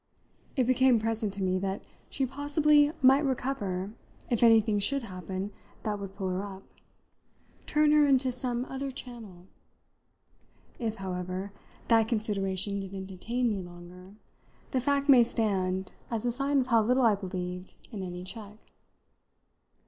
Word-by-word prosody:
It 260 - +3
became 255 -1 +4
present 220 -1 -1
to 195 - -3
me 185 0 +1
that 195 +1 -3 0.3
she 270 - -1
possibly 290 +2 +3
might 270 +3 +6
recover 210 -8 -2 0.4
if 235 - +1
anything 225 -3 +5
should 275 +6 +1
happen 190 0 -5 0.3
that 210 -1 -2
would 195 -1 -7
pull 195 -2 -3
her 185 +1 -1
up, 195 -1 -8 1.0
turn 300 0 +3
her 300 -1 +5
into 265 -2 +3
some 245 0 -2
other 270 +1 -4
channel. 230 -9 -8 1.3
If, 225 -3 -2
however, 185 0 -4 0.4
that 225 -2 +4
consideration 200 -3 0
didn't 195 0 -6
detain 230 +7 -2
me 200 -2 -2
longer 180 +2 -12 0.6
the 260 - +1
fact 280 +2 +1
may 260 -4 +8
stand 190 -5 -1 0.2
as 230 -1 -3
a 240 - +2
sign 275 +3 +1
of 255 - -3
how 225 - +6
little 250 +3 +3
I 225 - +6
believed 180 -2 -5 0.2
in 210 -4 -5
any 180 -1 -6
check. 210 +2 -8
215 Hz, 145 wpm, -29 LUFS, 190-255 Hz, 1.3 s, may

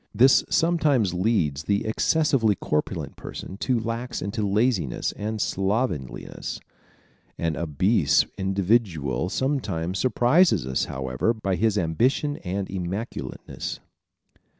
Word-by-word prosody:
This 130 +5 +6
sometimes 150 - +2
leads 90 -7 0
the 100 0 +1
excessively 115 -1 +2
corpulent 75 -4 -2
person 95 - -7
to 125 +4 0
relax 115 +2 -3
into 100 +3 -3
laziness 100 - +1
and 110 +1 -4
slovenliness. 95 - -2 0.8
An 80 -1 -1
obese 85 - +2
individual 95 - 0
sometimes 95 - -1
surprises 130 - +3
us, 65 0 0
however, 65 - -1
by 100 -3 -2
his 105 +3 +1
ambition 120 - +1
and 95 +1 -3
immaculateness. 95 - -5
100 Hz, 105 wpm, -25 LUFS, 85-120 Hz, 0.8 s, This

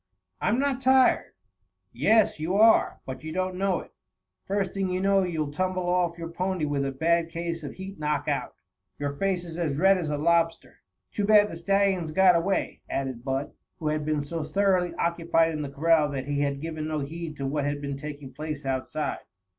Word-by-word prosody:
"I'm 230 - +2
not 270 -1 0
tired." 260 0 +4 0.6
"Yes, 220 -6 +3
you 165 +5 -1
are, 220 +2 +4
but 130 +2 -7
you 155 - -5
don't 185 +2 -1
know 190 -1 0
it. - - -15 0.5
First 195 -1 -1
thing 195 -1 -1
you 180 0 -1
know, 195 +1 +3
you'll 160 -5 -2
tumble 185 +3 -1
off 175 -1 +1
your 165 -1 -6
pony 180 -1 -1
with 145 -1 -1
a 135 - -1
bad 165 +4 +1
case 170 0 -4
of 145 -3 -6
heat 190 -1 -8
knock 150 -1 -1
out. - - -2 0.4
Your 145 0 -2
face 185 +3 -1
is 170 -1 -7
as 150 -5 -1
red 190 +3 +5
as 160 -4 -3
a 150 - -1
lobster. 165 +1 +1 0.3
Too 205 - -1
bad 210 0 +5
the - - -6
stallions 190 -1 +1
got 185 +2 +5
away," 185 +4 0
added 130 -3 -3
Bud, 135 +1 -2 0.3
who 155 -3 -2
had 155 0 -1
been 150 -1 0
so 160 +2 -4
thoroughly 185 -1 +1
occupied 165 -1 +1
in 155 -1 -3
the 145 - -4
corral 155 +1 +3
that 135 -2 -4
he 145 0 -1
had 140 -1 -1
given 155 -1 -4
no 155 -1 -2
heed 155 +2 -6
to 140 - -3
what 140 +1 -1
had 145 0 -1
been 140 -1 -4
taking 145 -1 -8
place 150 -1 -5
outside. 135 +3 -2
165 Hz, 200 wpm, -27 LUFS, 150-185 Hz, 0.6 s, red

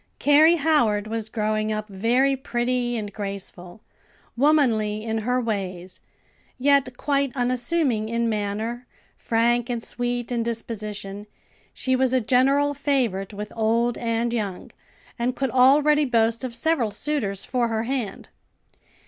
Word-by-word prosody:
Carrie 305 +4 +5
Howard 275 -10 +2
was 220 0 -4
growing 215 -1 -1
up 215 0 -3
very 240 +7 +1
pretty 245 -1 -1
and 205 -2 -5
graceful; 195 -2 -7 0.5
womanly 235 -7 +2
in 225 0 -2
her 250 +3 0
ways, 190 -6 -4 0.6
yet 275 -1 +2
quite 280 -2 0
unassuming 245 -2 0
in 235 0 0
manner, 220 +3 -3 0.3
frank 235 +1 +1
and 235 -2 -3
sweet 245 0 -3
in 240 -1 0
disposition, 210 -3 -5 0.4
she 260 0 -1
was 260 0 +1
a 260 - +4
general 275 +4 +2
favorite 255 -9 -1
with 210 0 -7
old 230 +1 +1
and 230 0 -1
young, 205 -6 -4 0.5
and 245 +2 0
could 270 -3 -1
already 290 +4 +5
boast 230 -1 +1
of 245 -2 -4
several 255 -2 +1
suitors 205 -3 -2
for 245 -2 0
her 225 -1 -1
hand. 240 -5 -4
235 Hz, 130 wpm, -24 LUFS, 215-260 Hz, 0.6 s, Carrie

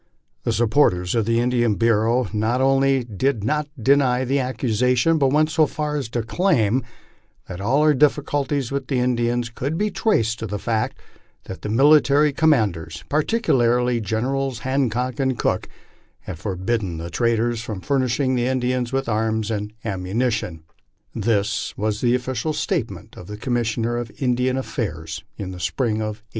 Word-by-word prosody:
The - - +1
supporters 110 -7 +2
of 115 -3 +1
the 115 0 +2
Indian 120 -3 +1
Bureau 115 +2 +2
not 110 +4 0
only 135 0 +3
did 115 +1 -1
not 150 +6 0
deny 130 0 +3
the 135 +3 +1
accusation, 125 +4 +1
but 135 -2 +3
went 155 +2 +2
so 160 -1 +3
far 150 0 -3
as 140 -6 -3
to 120 -1 -2
claim 130 - +1 0.6
that 90 +1 -7
all 135 +9 +2
our 155 -1 +5
difficulties 145 -2 +1
with 140 -2 -3
the 135 - 0
Indians 120 -1 0
could 140 +7 -3
be 210 +2 0
traced 115 - +1
to 115 - -4
the 105 +1 -3
fact 110 +1 -2 0.5
that 95 - -9
the - - -4
military 145 +4 +4
commanders, 100 - +1
particularly 125 - +2
Generals 125 +5 -1
Han 130 +1 +1
cock 125 +4 -3
and 130 -2 0
Cooke, - - -1 0.5
had 85 -4 -8
forbidden 95 -1 -2
the 85 +1 -6
traders 115 +3 0
from 110 -4 -5
furnishing 130 0 0
the 125 -1 +1
Indian 125 -1 0
with 135 0 -1
arms 110 0 0
and 105 -1 -3
ammunition. 100 -3 -2 0.5
This 105 -2 -1
was 105 0 -1
the 120 0 +3
official 130 +4 -2
statement - - -3
of 90 - -11
the 105 - -7
Commissioner 120 0 -1
of 120 -1 -4
Indian 125 0 0
Affairs 80 - -4
in 95 -2 -5
the 90 - -8
spring 110 - -1
of 110 0 -4
1867. - - -42
120 Hz, 160 wpm, -22 LUFS, 110-135 Hz, 0.6 s, our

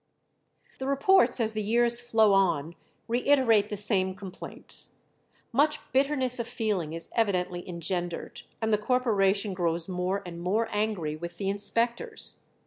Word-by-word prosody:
The 265 - -3
reports 370 +5 +4
as 220 -1 0
the 215 - -2
years 235 +3 +3
flow 220 -3 +3
on 170 -5 +2 0.3
reiterate 235 -4 +3
the 210 - -4
same 190 -2 +1
complaints. 195 -2 -7 0.6
Much 300 +5 +3
bitterness 260 -2 +2
of 235 - -3
feeling 200 -10 -2
is 165 0 -6
evidently 180 -5 -1
engendered, 175 0 -4 0.2
and 220 0 +1
the 210 - +3
corporation 210 -4 +1
grows 170 -2 -1
more 185 +2 -2
and 170 -1 -8
more 210 +6 0
angry 205 -8 -1
with 170 +2 -8
the 195 -1 -2
inspectors. 230 +4 -1
205 Hz, 135 wpm, -28 LUFS, 180-235 Hz, 0.6 s, reports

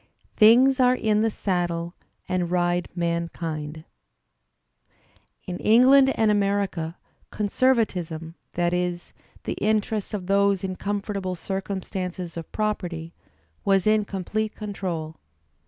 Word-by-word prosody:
"Things 250 +5 +6
are 250 0 +5
in 215 -3 +1
the 225 - +2
saddle 175 -4 -2 0.3
and 180 -2 -1
ride 175 0 +1
mankind." 165 -3 -3 1.6
In 180 -1 -5
England 265 +4 +6
and 220 -1 +3
America, 200 -5 0 0.3
conservatism, 195 -8 0 0.2
that 175 0 0
is, 180 -1 -2 0.3
the - - -2
interests 215 0 0
of 190 -3 -5
those 200 0 +2
in 185 -1 -3
comfortable 200 -2 -3
circumstances 185 -1 -4
of 165 -1 -7
property, 180 -6 -3 0.5
was 195 -2 +3
in 215 0 +4
complete 210 +2 -3
control. 180 -7 -4
190 Hz, 105 wpm, -25 LUFS, 175-215 Hz, 1.6 s, Things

